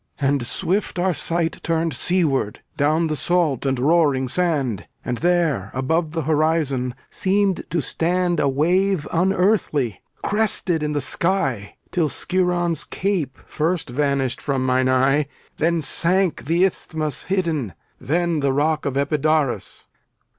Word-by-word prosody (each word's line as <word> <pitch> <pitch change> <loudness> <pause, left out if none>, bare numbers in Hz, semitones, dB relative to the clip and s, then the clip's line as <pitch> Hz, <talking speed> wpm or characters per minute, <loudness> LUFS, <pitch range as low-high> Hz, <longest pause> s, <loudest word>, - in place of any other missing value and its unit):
And 140 -2 +1
swift 190 +7 -1
our 180 +1 +1
sight 165 0 -2
Turned 165 0 0
seaward, 150 - 0
down 155 +4 +2
the 155 -1 -1
salt 155 -4 0
and 135 -1 +1
roaring 140 -1 +2
sand. 135 - -1 0.2
And 120 -1 -2
there, 170 - +1
above 155 +5 0
the 165 -2 -2
horizon, 150 -5 0 0.2
seemed 195 -1 +1
to 165 -2 -1
stand 175 +3 0
A 140 - +2
wave 175 +5 +1
unearthly, 180 - +1 0.2
crested 205 -6 +1
in 150 0 -1
the 145 - 0
sky; 130 - 0 0.2
Till 165 -4 +1
Skiron's 175 -3 0
Cape 175 -9 -2
first 160 -3 -2
vanished 140 -1 0
from 135 -2 -1
mine 130 0 +2
eye, 135 +3 +3 0.3
Then 165 0 +1
sank 180 +5 +1
the 170 +5 +3
Isthmus 155 -6 -2
hidden, 160 - -1 0.2
then 170 +1 0
the 140 -1 +1
rock 150 +2 +1
Of 135 -1 -2
Epidaurus. 150 -1 0
155 Hz, 130 wpm, -22 LUFS, 135-175 Hz, 0.3 s, eye